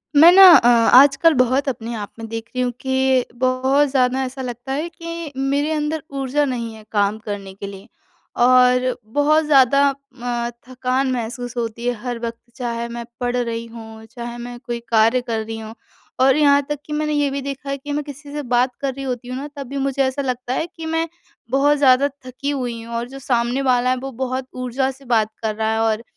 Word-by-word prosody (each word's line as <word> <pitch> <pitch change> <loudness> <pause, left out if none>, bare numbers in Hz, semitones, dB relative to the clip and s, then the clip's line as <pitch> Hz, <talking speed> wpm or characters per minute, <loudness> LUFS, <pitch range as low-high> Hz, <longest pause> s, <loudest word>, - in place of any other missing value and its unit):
मैं 325 +4 +9
ना 385 +1 +8
अ, 235 - +3
आजकल 270 +7 +6
बहुत 260 +4 0
अपने 235 -2 -5
आप 205 -2 -6
में 225 - -6
देख 225 0 -5
रही 255 - 0
हूँ 245 - 0
कि 265 -1 +2
बहुत 260 +3 +2
ज़्यादा 260 0 +1
ऐसा 260 +1 -6
लगता 245 +1 -6
है 300 +5 -2
कि 335 -2 -7
मेरे 280 +3 0
अंदर 305 0 -2 0.2
ऊर्जा 270 +2 +1
नहीं 235 -4 -3
है 220 - -13
काम 205 0 +1
करने 200 -2 -5
के 200 +1 -8
लिए 195 +1 -10 0.6
और 250 0 +4 0.2
बहुत 300 +2 +3
ज़्यादा 280 -1 +5
अ, 245 -4 -5 0.2
थकान 255 +1 -1
महसूस 245 0 -4
होती 235 0 -3
है 245 - +2
हर 245 -2 -3
वक़्त। 230 0 -5 0.2
चाहे 235 -2 -3
मैं 235 0 -6
पढ़ 245 0 -1
रही 230 -1 -2
हूँ, 225 -1 -11
चाहे 235 +1 -8
मैं 240 0 -8
कोई 240 -1 -5
कार्य 230 +2 +4
कर 230 -3 -3
रही 225 0 -6
हूँ 220 0 -9 0.5
और 265 0 +5
यहाँ 285 -1 +5
तक 295 -1 -2
कि 300 - -6
मैंने 300 0 -1
ये 290 -1 +1
भी 275 +1 -3
देखा 275 0 -6
है 275 - -2
कि 290 +2 -8
मैं 295 +1 -1
किसी 285 0 -10
से 295 - -3
बात 250 -1 +1
कर 275 -1 -1
रही 275 +1 -7
होती 250 -2 -4
हूँ 255 +1 -4
ना, 280 +2 -5
तब 280 -2 -7
भी 280 +3 -5
मुझे 275 0 -1
ऐसा 260 +1 -1
लगता 255 -1 -3
है 320 - -1
कि 325 - -7
मैं 325 +1 -1 0.4
बहुत 285 +2 +3
ज़्यादा 275 0 +5 0.2
थकी 255 +3 -5
हुई 245 -5 -3
हूँ 230 0 -7
और 235 +1 -2
जो 270 +1 -9
सामने 245 0 0
वाला 250 -2 +2
है, 255 - +2
वो 270 +2 -6
बहुत 260 +1 -3
ऊर्जा 255 +1 -1
से 270 +1 -17
बात 220 -3 +1
कर 215 -1 -1
रहा 220 0 0
है 220 - 0
और 225 0 0
255 Hz, 220 wpm, -20 LUFS, 235-275 Hz, 0.6 s, मैं